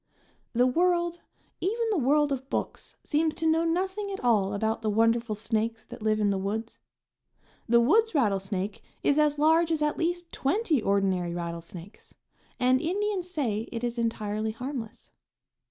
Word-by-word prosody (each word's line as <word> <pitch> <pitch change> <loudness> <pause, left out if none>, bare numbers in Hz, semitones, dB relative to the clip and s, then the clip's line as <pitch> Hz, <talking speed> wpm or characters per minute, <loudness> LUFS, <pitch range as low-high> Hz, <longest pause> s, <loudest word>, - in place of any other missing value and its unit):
The 245 +1 +4
world, 345 +4 +1 0.4
even 455 +5 0
the 395 - +1
world 290 +2 +3
of 265 0 -3
books, - - -4
seems 310 +1 0
to 325 - -3
know 320 +1 +3
nothing 380 +5 -1
at 390 - -4
all 210 -5 +2
about 220 +2 -1
the 220 - 0
wonderful 230 +1 +2
snakes 220 +1 -2
that - - -11
live 215 0 +1
in 205 -1 +2
the 195 - -1
woods. 220 +4 -4 0.9
The 235 0 +6
woods 430 - +3
rattlesnake 195 -5 0 0.2
is 290 +1 +3
as 300 -1 +3
large 320 +3 +4
as 310 -2 +1
at 300 - 0
least 345 0 -2
twenty 315 - +1
ordinary 190 -4 +1
rattlesnakes; 170 +2 -8 0.4
and 255 +1 +3
Indians 375 +1 -1
say 235 - -2
it 230 0 -5
is 240 0 -2
entirely 215 -1 -2
harmless. 250 -2 -7
250 Hz, 155 wpm, -27 LUFS, 215-330 Hz, 0.9 s, The